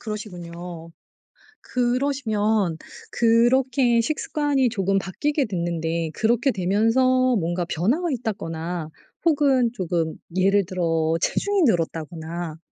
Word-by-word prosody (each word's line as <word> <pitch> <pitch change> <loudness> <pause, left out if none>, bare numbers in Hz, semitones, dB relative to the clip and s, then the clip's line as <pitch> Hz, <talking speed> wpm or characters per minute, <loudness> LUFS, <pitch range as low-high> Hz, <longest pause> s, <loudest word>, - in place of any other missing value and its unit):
그러시군요. 175 -5 -7 0.7
그러시면 225 - 0 0.3
그렇게 240 +1 +3
식습관이 290 0 0
조금 195 -3 0
바뀌게 285 - -1
됐는데 170 -3 -2
그렇게 235 - +2
되면서 240 +7 +2
뭔가 175 0 -1
변화가 235 - 0
있다거나 175 - -4 0.4
혹은 275 -7 +3
조금 170 -6 -2 0.2
예를 195 +1 +3
들어 165 -3 0
체중이 405 -1 +1
늘었다거나 165 - -2
205 Hz, 260 characters per minute, -23 LUFS, 170-250 Hz, 0.7 s, 그렇게